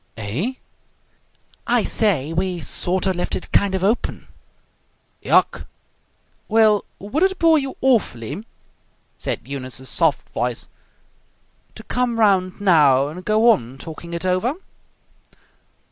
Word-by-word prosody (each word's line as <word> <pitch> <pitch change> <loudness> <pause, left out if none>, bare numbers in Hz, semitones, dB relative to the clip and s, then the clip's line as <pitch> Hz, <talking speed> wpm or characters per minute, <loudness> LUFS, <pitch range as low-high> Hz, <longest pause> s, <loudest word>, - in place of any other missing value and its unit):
"Eh?" 120 - -3 1.1
"I - - +3
say, 165 - +1
we 180 +1 -1
sort 180 +3 -1
of 190 -1 +1
left 175 - -2
it 185 - -7
kind 200 -1 +2
of 190 - -2
open." 215 +5 -1 0.9
"Yuk!" - - +2 0.8
"Well, 215 -2 +3
would 210 - -3
it 380 0 +2
bore 325 -2 +4
you 270 -1 -5
awfully," 195 - 0 0.7
said - - -3
Eunice's 130 -1 -5
soft 165 -4 +1
voice, 120 0 -3 1.1
"to 220 - -10
come 245 0 -1
round 190 -3 +2
now 145 -8 +4
and 180 +4 -9
go 215 +4 +4
on 125 - -2
talking 170 +3 -8
it 170 - -4
over?" 185 +8 +1
185 Hz, 120 wpm, -21 LUFS, 150-220 Hz, 1.1 s, bore